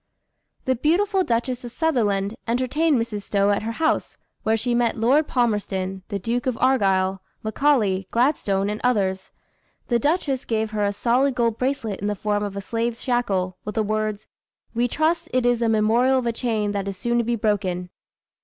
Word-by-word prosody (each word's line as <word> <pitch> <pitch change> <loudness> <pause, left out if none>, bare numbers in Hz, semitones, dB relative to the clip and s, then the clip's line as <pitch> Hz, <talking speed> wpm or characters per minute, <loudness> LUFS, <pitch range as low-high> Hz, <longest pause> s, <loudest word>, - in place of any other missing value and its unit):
The 260 - +2
beautiful 375 - +2
Duchess 245 -1 -1
of 240 - -6
Sutherland 215 -10 0
entertained 260 +5 +1
Mrs. 230 -3 -3
Stowe 200 0 +1
at 200 - +1
her 225 +1 -3
house, 315 +6 0 0.2
where 220 +1 +1
she 240 +2 -1
met 240 -1 +1
Lord 265 +7 +3
Palmerston, 195 -6 -1
the 200 - -3
Duke 235 +6 -2
of 255 - 0
Argyle, 195 -7 +2 0.2
Macaulay, 215 -5 +1
Gladstone, 230 -6 +1
and 210 - -5
others. 195 -6 0 0.6
The 240 -1 +3
duchess 285 -2 0
gave 220 -1 -1
her 210 -1 -1
a 200 - +2
solid 250 +6 +1
gold 230 -2 0
bracelet 255 -6 -1
in 205 - -2
the 210 - -1
form 205 +1 -1
of 205 -1 -4
a - - -3
slave's 230 +3 -2
shackle, 195 -8 0
with 210 - -6
the 220 - +2
words, 215 0 -2 0.5
"We 240 +1 +1
trust 325 +5 0
it 255 -1 +2
is 245 -1 +2
a 230 - +2
memorial 225 +4 +3
of 255 - -1
a 235 - 0
chain 220 -4 -1
that 200 -1 -3
is 195 -1 -4
soon 240 +4 0
to - - +2
be 235 +1 0
broken." 190 -5 -1
230 Hz, 185 wpm, -23 LUFS, 205-250 Hz, 0.6 s, Lord